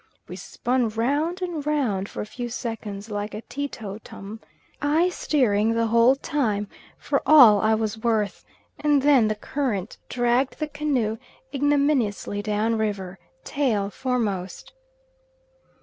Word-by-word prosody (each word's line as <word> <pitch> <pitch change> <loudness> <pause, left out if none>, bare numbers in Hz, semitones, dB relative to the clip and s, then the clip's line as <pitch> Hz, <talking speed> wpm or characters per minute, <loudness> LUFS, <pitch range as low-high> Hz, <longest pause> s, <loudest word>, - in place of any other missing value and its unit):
We - - -7
spun 245 -2 -1
round 290 - -1
and 340 -5 -3
round 250 -10 -1
for - - -5
a - - -4
few 240 +3 -6
seconds, 225 -3 -6
like 205 0 -4
a 215 - -7
teetotum, 220 -5 -7 0.4
I 310 +5 +3
steering 230 - +1
the 230 0 +2
whole 235 +3 +5
time 220 -8 -1 0.3
for - - -1
all 245 -10 +8
I 220 0 +3
was 220 0 -2
worth, 220 -3 -1 0.4
and 295 -2 +2
then 275 -6 +5
the 215 - 0
current 215 -4 -3
dragged 245 +2 +1
the 305 - -1
canoe 270 -7 -1 0.3
ignominiously 280 -8 +1
down 215 +2 0
river, 195 -3 -3 0.2
tail 220 -9 0
foremost. 205 -8 -3
230 Hz, 130 wpm, -24 LUFS, 210-280 Hz, 0.4 s, all